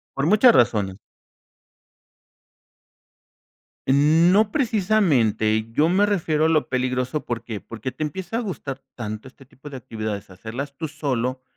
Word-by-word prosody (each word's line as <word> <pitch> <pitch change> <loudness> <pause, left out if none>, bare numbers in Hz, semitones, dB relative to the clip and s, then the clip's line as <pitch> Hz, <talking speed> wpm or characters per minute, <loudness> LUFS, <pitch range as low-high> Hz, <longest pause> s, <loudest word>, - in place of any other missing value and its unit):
Por 135 +1 0
muchas 215 +7 +6
razones. 105 -5 +2 2.9
No 165 +9 +4
precisamente 160 - +2
yo 150 +6 +3
me 195 +4 +3
refiero 160 -6 +1
a 160 - +4
lo 155 -2 +2
peligroso, 130 +2 -1
¿por 115 -1 -4
qué? 110 -4 -6
Porque 115 +3 -6
te 155 - -4
empieza 190 +8 -4
a - - 0
gustar 145 - -5
tanto 110 -1 -6
este 135 +1 -15
tipo 135 +3 -13
de 135 - -7
actividades, 110 -4 -5
hacerlas 120 +9 -7
tú 160 +1 -4
solo, 130 -4 -2
135 Hz, 135 wpm, -23 LUFS, 115-170 Hz, 2.9 s, muchas